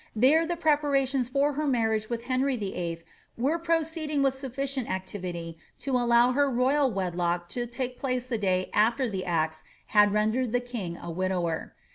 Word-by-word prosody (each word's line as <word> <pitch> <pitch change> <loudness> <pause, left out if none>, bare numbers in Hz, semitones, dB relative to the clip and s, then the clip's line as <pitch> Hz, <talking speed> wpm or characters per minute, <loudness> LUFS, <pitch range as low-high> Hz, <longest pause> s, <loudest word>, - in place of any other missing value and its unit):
There 295 +9 +4
the 345 - -1
preparations 285 -5 +2
for 280 +3 +1
her 300 +2 -1
marriage 220 -4 +1
with 235 -1 -3
Henry 260 +1 0
Vlll. 175 -5 -4 0.3
were 285 +8 +1
proceed 325 -1 -1
ing 290 -2 +1
with 270 -1 +3
sufficient 270 -1 -3
activity 180 -3 -5 0.2
to 275 - -4
aUow 240 0 +4
her 285 +1 +3
royal 265 +3 +2
wedlock 175 -3 -1
to 240 +3 -3
take 250 +1 -4
place 255 -3 -1
the 240 -3 -2
day 185 -2 0
after 235 +5 +3
the 190 -4 -3
axe 160 -3 -1 0.3
had 210 -1 +6
rendered 220 +3 +1
the 245 - +3
king 230 -9 -5
a 170 - -7
widower. 180 -2 -2
245 Hz, 170 wpm, -27 LUFS, 190-275 Hz, 0.3 s, had